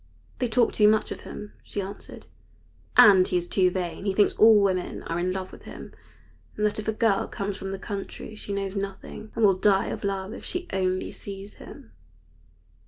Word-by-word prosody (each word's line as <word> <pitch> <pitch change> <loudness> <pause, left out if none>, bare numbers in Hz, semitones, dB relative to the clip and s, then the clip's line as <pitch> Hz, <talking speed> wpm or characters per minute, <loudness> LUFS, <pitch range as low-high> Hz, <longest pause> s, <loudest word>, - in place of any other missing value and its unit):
"They 250 - +1
talk 235 +1 +2
too 210 - +5
much 215 0 +2
of - - -5
him," 210 - -9
she - - -6
answered, 200 +1 -8 0.7
"and 190 -3 +8
he 180 - +1
is 175 0 -2
too 185 -1 +3
vain. 180 +1 -4
He 195 - +1
thinks 205 +1 +3
all 220 -1 +7
women 190 -3 0
are 165 - -3
in 180 +1 0
love 185 0 -4
with - - -14
him, - - -10 0.6
and 210 - +1
that 210 0 0
if 215 - -6
a - - +2
girl 220 -2 +1
comes 200 0 -4
from 195 -1 -6
the 195 - -4
country 200 +2 -6
she 210 -1 -8
knows 200 0 -3
nothing, 195 +2 -6
and 225 - +3
will 195 - +6
die 195 +1 +2
of - - -5
love 195 +1 -2
if - - -9
she 360 0 -4
only 185 -1 -1
sees 200 0 -8
him." 275 -6 -12
200 Hz, 205 wpm, -26 LUFS, 190-210 Hz, 0.7 s, and